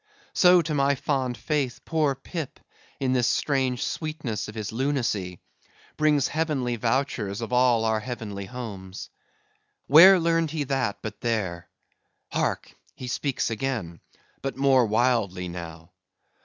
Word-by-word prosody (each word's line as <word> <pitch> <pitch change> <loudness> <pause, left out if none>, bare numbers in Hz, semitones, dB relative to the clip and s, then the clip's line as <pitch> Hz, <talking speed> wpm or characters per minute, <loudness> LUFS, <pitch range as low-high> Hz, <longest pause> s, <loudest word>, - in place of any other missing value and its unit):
So, 180 -1 +6
to 155 -1 -3
my 140 0 +2
fond 130 -3 -1
faith, 145 -5 -2
poor 155 -4 +1
Pip, 150 +2 -6 0.4
in 130 -1 +1
this 125 -3 +2
strange 130 -3 0
sweetness 155 - -4
of 110 - -9
his 110 -2 -4
lunacy, 115 -8 -1 0.6
brings 150 -3 +3
heavenly 145 -6 -1
vouchers 115 -4 -1
of 115 +1 -5
all 125 -2 +4
our 110 -1 +1
heavenly 110 -4 -6
homes. 100 -6 -8 0.7
Where 185 +6 +9
learned 165 -1 +1
he 155 -1 -2
that, 130 -7 -1
but 110 0 -6
there?—Hark! 95 -8 -4 0.2
he 130 - -8
speaks 130 -1 -1
again: 110 - -3 0.4
but 135 -1 -4
more 135 -3 +4
wildly 110 -5 +1
now." 85 -1 -8
125 Hz, 130 wpm, -26 LUFS, 110-140 Hz, 0.7 s, Where